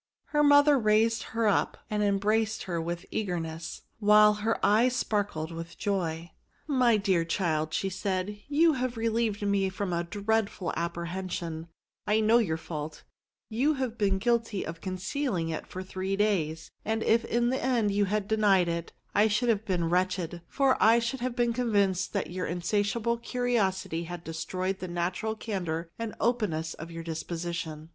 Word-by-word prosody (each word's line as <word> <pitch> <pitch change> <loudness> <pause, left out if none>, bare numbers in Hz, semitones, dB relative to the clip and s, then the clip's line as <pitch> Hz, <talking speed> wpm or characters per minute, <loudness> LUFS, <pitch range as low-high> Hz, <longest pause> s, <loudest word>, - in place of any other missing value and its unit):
Her 295 - +2
mother 285 -1 +6
raised 220 +1 +3 0.2
her 230 -1 +3
up, 205 - +1
and 210 0 -1
embraced 210 +2 +1
her 170 -3 -2
with 170 +2 -4
eager 180 -5 -1
ness, 160 0 -6 0.2
while 210 0 +6
her 225 +1 +1
eyes 235 +5 +4
sparkled 200 -9 -1
with 165 0 -7
joy. 170 -4 -2 0.2
*' - - -41
My 250 -6 +4
dear 190 -4 +2
child," 160 -3 0
said 190 -1 -1
she, 210 0 -10
" - - -34
you 315 +3 +4
have 250 -2 -2
re 230 0 +1
lieved 220 -3 0
me 200 -1 +2
from 190 -1 -3
a 170 0 0
dreadful 205 0 -1
apprehension: 170 -1 -4 0.4
I 210 +1 +3
know 220 +2 +5
your 165 -9 0
fault; 155 -1 -6 0.4
you 270 +8 +1
have 260 -4 -2
been 195 -2 +2
guilty 230 -1 0
of 165 0 -7
concealing 185 - -2
it 160 - -4
for 185 - -6
three 190 +1 -3
days; 165 -7 0
and 220 +1 -1
if 230 +1 +3
in 240 +1 +1
the 260 - -1
end 240 -5 +2
you 205 0 +2
had 205 +1 -1
denied 200 -5 +3
it, 170 0 -3 0.2
I 210 +2 +5
should 230 +3 +1
have 220 -1 +1
been 180 -5 0
wretched; 180 -1 0
for 270 -2 +2
I 225 +2 +6
should 235 +3 -1
have 245 0 -2
been 240 -1 +1
convinced 200 -6 +1
that 195 -3 -2
your 180 0 -3
insatiable 205 +6 0
curiosity 200 -9 -1
had 175 0 -7
destroyed 185 +4 -3
the 185 - -5
natural 180 +5 -2
candour 175 -7 -3
and 230 -2 -4
openness 200 -9 0
of 160 +2 -9
your 165 0 -7
dis 165 -1 -4
position. 165 -2 -5
200 Hz, 175 wpm, -28 LUFS, 170-225 Hz, 0.4 s, mother